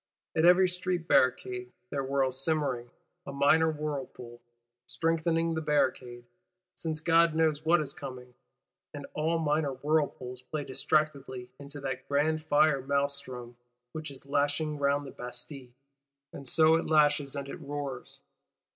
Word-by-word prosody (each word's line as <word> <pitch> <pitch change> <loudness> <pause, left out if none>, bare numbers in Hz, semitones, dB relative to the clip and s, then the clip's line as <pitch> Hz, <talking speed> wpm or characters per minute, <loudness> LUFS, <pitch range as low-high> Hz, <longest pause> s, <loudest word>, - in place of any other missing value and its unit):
At 160 - +3
every 180 +1 +7
street 180 -1 -3
barricade, 125 -1 +2 0.2
there 140 - -1
whirls 135 -1 0
simmering, 140 -7 -1 0.4
a - - -4
minor 145 +4 +4
whirlpool,—strengthening 135 +3 -3
the 160 - -2
barricade, 130 -5 0 0.5
since 160 -3 -3
God 165 0 +4
knows 155 -2 +2
what 165 +1 +4
is 140 -2 -4
coming; 125 -2 -9 0.6
and - - -6
all 160 +2 0
minor 150 -3 0
whirlpools 130 -3 -1
play 145 +3 -4
distractedly 135 -3 -1
into 145 +1 -9
that 130 -1 -4
grand 155 +2 +1
Fire 150 -2 +3
Mahlstrom 135 -3 -2 0.3
which 155 +1 -6
is 135 -1 -9
lashing 145 +2 0
round 140 0 +1
the 135 - -8
Bastille. 125 +2 -8 0.6
And 140 - -8
so 160 +4 +5
it 165 - -3
lashes 145 -2 +3
and 140 -1 -4
it - - -7
roars. 140 -3 -6
145 Hz, 135 wpm, -29 LUFS, 130-155 Hz, 0.6 s, every